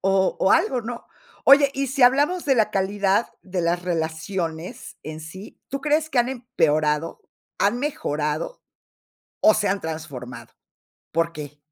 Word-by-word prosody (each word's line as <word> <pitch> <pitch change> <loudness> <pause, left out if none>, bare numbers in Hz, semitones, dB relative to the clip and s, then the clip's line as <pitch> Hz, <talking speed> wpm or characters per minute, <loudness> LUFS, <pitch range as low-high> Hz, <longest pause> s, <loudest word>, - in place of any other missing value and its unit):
O 190 0 +2
o 190 - +4
algo, 325 - +3
¿no? 235 +1 -7 0.4
Oye, 280 0 +7
y 275 0 -1
si 270 +1 0
hablamos 290 +8 +4
de 270 -2 +3
la 220 -3 +2
calidad 195 +1 +1
de 185 -2 -3
las 175 +1 0
relaciones 165 0 -4
en 155 0 -7
sí, 185 +6 -11
¿tú 275 0 -4
crees 305 +2 +1
que 255 - 0
han 240 +1 +3
empeorado, 165 - 0 0.4
han 210 +5 +2
mejorado 155 - -2 0.8
o 215 - +7
se 205 - +1
han 195 +1 0
transformado? 155 -6 -7 0.6
¿Por 165 +1 +1
qué? 150 -2 -8
195 Hz, 150 wpm, -23 LUFS, 160-250 Hz, 0.8 s, Oye